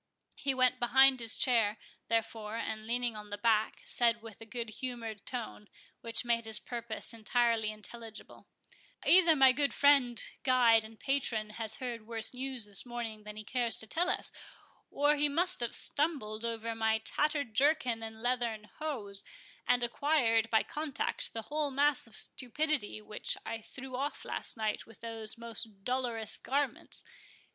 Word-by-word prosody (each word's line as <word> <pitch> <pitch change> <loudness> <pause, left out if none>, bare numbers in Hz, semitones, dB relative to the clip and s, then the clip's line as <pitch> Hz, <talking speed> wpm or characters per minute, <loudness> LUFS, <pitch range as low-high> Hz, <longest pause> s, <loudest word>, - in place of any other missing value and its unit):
He 275 -1 0
went 255 0 +3
behind 265 +2 +6
his 230 -1 +3
chair, 225 -5 +3 0.3
therefore, 225 -1 -2
and, 220 -1 -4
leaning 240 -1 0
on 210 0 -8
the 205 - -4
back, 220 0 +1
said 235 -1 +1
with 225 -1 -11
a 225 - -10
good 230 0 -4
humoured 230 -5 -5
tone, 225 -4 -5 0.3
which 230 +1 -1
made 230 -1 +1
his 220 -1 +2
purpose 235 -1 -4
entirely 230 0 +1
intelligible,— 220 +1 -9 0.6
"Either 340 -3 +6
my 265 -2 +7
good 280 +2 0
friend, 275 -4 +4 0.2
guide, 240 -4 +4
and 220 0 -13
patron, 235 -6 -1
has 220 0 -3
heard 235 -4 -6
worse 230 0 -1
news 255 -2 -1
this 205 -2 +3
morning 230 -3 -6
than 210 0 -8
he 215 - -7
cares 240 +1 +1
to - - +1
tell 345 - 0
us, - - -1 0.6
or 290 +1 +2
he 295 0 +2
must 350 +5 +2
have 240 -1 -2
stumbled 270 -8 0
over 230 0 -2
my 220 0 +1
tattered 285 +2 -1
jerkin 265 -4 +2
and 220 0 -8
leathern 235 -4 -2
hose, 220 -11 -3 0.4
and 245 0 +3
acquired, 240 -3 +2
by 220 -1 +3
contact, 300 -2 -2
the 225 - -5
whole 295 +2 -1
mass 280 -1 +2
of 220 - -11
stupidity 260 -4 -1
which 210 - +1
I 225 - -4
threw 260 +3 -9
off 280 +3 -3
last - - -1
night 215 -1 -2
with 225 -1 -16
those 225 -1 -1
most 225 -3 -5
dolorous 240 -3 0
garments. 280 +1 -3
235 Hz, 160 wpm, -32 LUFS, 220-265 Hz, 0.6 s, my